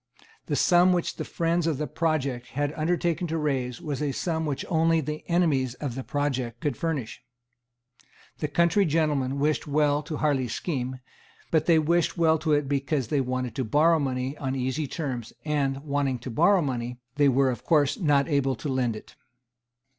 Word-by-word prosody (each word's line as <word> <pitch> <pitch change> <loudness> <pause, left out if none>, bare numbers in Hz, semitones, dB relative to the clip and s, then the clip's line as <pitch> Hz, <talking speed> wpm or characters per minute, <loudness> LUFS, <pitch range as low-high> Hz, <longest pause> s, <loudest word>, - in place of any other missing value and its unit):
The - - 0
sum 180 -1 +5
which 175 -1 -1
the - - -3
friends 170 0 0
of 155 -4 0
the 150 - -2
project 140 -7 -1
had 145 +1 -2
undertaken 170 +2 0
to 165 0 -2
raise 130 -5 -1
was 145 -4 -4
a 145 -2 0
sum 160 0 -2
which 140 -2 -3
only 165 -1 +3
the 150 0 -4
enemies 145 -8 +1
of 135 -2 -4
the 130 +2 -5
project 130 -5 -2
could 145 0 -1
furnish. 140 -7 -3 1.2
The 150 - -1
country 170 +6 +3
gentlemen 145 -4 +1
wished 150 +2 0
well 145 0 +2
to 155 0 -5
Harley's 135 -6 0
scheme; 130 -5 -3 0.5
but 160 -2 +2
they 165 -2 +6
wished 170 +3 +1
well 160 -1 +3
to 160 0 -1
it 145 -1 +1
because 135 -2 -1
they 145 - +2
wanted 130 -2 -2
to 130 - 0
borrow 155 +8 +3
money 130 -1 -2
on 135 -1 -2
easy 130 +3 -2
terms; 130 -8 -4
and, 140 -2 -1
wanting 140 -3 0
to 120 +1 -7
borrow 190 - +4
money, 125 -3 -3 0.2
they 145 -1 +5
of 130 -2 +2
course 150 -4 +3
were 200 - -8
not 145 -3 +3
able 140 -4 +1
to 140 - -5
lend 125 -4 0
it. 110 - -12
145 Hz, 185 wpm, -26 LUFS, 130-160 Hz, 1.2 s, they